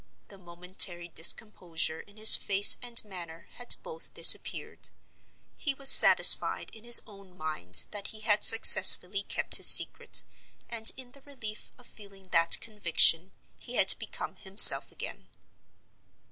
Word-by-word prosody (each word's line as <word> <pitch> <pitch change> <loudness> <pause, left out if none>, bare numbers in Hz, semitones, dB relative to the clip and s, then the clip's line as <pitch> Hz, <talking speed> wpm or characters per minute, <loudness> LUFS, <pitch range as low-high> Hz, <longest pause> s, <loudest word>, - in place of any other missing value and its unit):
The 195 - -21
momentary 175 0 -7
discomposure 165 -2 -3
in 205 +1 -22
his 215 0 +4
face 200 0 -1
and 240 -2 -1
manner 170 -5 -17
had 245 -1 -1
both 475 - -10
disappeared. - - +1 0.7
He 285 -3 -9
was 275 0 -1
satisfied - - +2
in 225 +1 -18
his 240 0 +5
own 195 -4 -24
mind 90 - -4
that 205 -2 -13
he 215 - -16
had 210 -1 -5
successfully 200 -3 +3
kept - - 0
his - - +5
secret, - - +2 0.4
and 225 -1 -3
in 255 -2 -15
the 280 +1 -26
relief 225 -7 -16
of 245 - -21
feeling 195 -4 -20
that 165 0 -1
conviction 180 -4 -3 0.3
he - - -16
had - - -1
become - - -14
himself 195 +1 +4
again. - - -14
200 Hz, 140 wpm, -22 LUFS, 175-225 Hz, 0.7 s, his